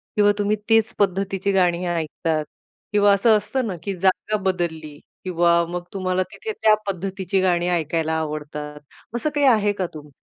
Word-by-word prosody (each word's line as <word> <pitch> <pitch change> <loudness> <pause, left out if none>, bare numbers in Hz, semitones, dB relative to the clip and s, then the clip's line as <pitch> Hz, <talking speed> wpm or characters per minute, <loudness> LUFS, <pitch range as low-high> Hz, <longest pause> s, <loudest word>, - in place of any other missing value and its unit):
किंवा 205 -1 +5
तुम्ही 205 +1 +2
तीच 225 -1 +3
पद्धतीची 195 0 0
गाणी 180 -2 +2
ऐकतात 155 -1 -2 0.5
किंवा 205 -1 +5
असं 215 +2 +4
असतं 230 +4 -2
ना 190 - -3
की 200 - -2
जागा 190 +3 +1
बदलली 160 -5 -2 0.2
किंवा 170 -1 +3
मग 175 0 -4
तुम्हाला 185 -1 0
तिथे 440 - -6
त्या 215 - +6
पद्धतीची 190 +1 -2
गाणी 175 -2 +2
ऐकायला 160 -1 0
आवडतात. 150 -1 -5 0.4
असं 240 +6 0
काही 290 -1 +3
आहे 215 -5 +4
का 190 -2 -2
तुमचं? 150 -1 -10
185 Hz, 160 wpm, -22 LUFS, 170-205 Hz, 0.5 s, त्या